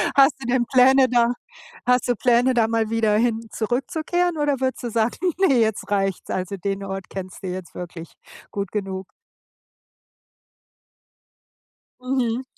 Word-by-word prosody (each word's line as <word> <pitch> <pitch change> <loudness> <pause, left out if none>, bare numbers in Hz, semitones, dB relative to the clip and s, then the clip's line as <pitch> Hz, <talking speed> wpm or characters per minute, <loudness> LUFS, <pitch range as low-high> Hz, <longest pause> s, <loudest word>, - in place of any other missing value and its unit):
Hast 275 +1 +6
du 260 - -6
denn 245 -1 +2
Pläne 260 +1 +6
da 240 0 +3 0.5
hast 250 0 +2
du 245 - +2
Pläne, 245 +2 +3
da 230 -2 +3
mal 225 -1 0
wieder 220 -2 +2
hin 230 -1 0
zurückzukehren 315 +9 -1
oder 290 -3 0
würdest 260 -1 -2
du 240 - -3
sagen: 225 +1 0 0.2
„Ne, 305 -11 +4
jetzt 220 -3 0
reicht's.“ 195 -2 -1
Also, 185 +1 -3
den 195 +1 -3
Ort 195 -1 -6
kennst 190 0 -8
du - - -4
jetzt 180 -1 -6
wirklich 175 -1 -8 0.4
gut 200 -2 -4
genug? 190 -2 -4 2.9
Mhm. 255 -1 -1
230 Hz, 145 wpm, -23 LUFS, 200-255 Hz, 2.9 s, Hast